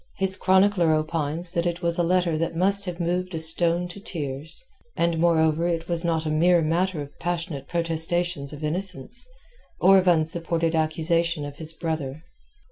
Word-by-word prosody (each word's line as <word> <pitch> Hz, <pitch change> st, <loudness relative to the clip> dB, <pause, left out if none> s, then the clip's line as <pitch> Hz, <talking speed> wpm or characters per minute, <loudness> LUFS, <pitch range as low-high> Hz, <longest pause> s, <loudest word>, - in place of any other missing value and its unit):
His 190 Hz, 0 st, +2 dB
chronicler 190 Hz, -3 st, +3 dB
opines 155 Hz, +2 st, -2 dB
that 170 Hz, 0 st, -1 dB
it 175 Hz, +1 st, -4 dB
was 170 Hz, 0 st, 0 dB
a -, -, +3 dB
letter 175 Hz, -1 st, +1 dB
that 165 Hz, +1 st, -2 dB
must 200 Hz, +3 st, +2 dB
have 180 Hz, -1 st, -6 dB
moved 180 Hz, +1 st, -2 dB
a -, -, -2 dB
stone 170 Hz, +2 st, +2 dB
to 175 Hz, -, -9 dB
tears. 150 Hz, -, -4 dB, 0.3 s
And, 170 Hz, -1 st, 0 dB
moreover, 165 Hz, -1 st, +2 dB
it 165 Hz, -1 st, -2 dB
was 170 Hz, -1 st, +7 dB
not 165 Hz, -2 st, -1 dB
a 155 Hz, -, -1 dB
mere 170 Hz, +2 st, +3 dB
matter 170 Hz, 0 st, -1 dB
of 140 Hz, +1 st, -15 dB
passionate 165 Hz, -5 st, -4 dB
protestations 165 Hz, -2 st, 0 dB
of 150 Hz, 0 st, -9 dB
innocence, 185 Hz, -, -3 dB, 0.5 s
or 190 Hz, +1 st, +6 dB
of 185 Hz, -, -2 dB
unsupported 165 Hz, 0 st, +1 dB
accusation 160 Hz, 0 st, 0 dB
of 145 Hz, 0 st, -9 dB
his 160 Hz, -1 st, -3 dB
brother. 160 Hz, -3 st, -4 dB
170 Hz, 170 wpm, -24 LUFS, 160-175 Hz, 0.5 s, was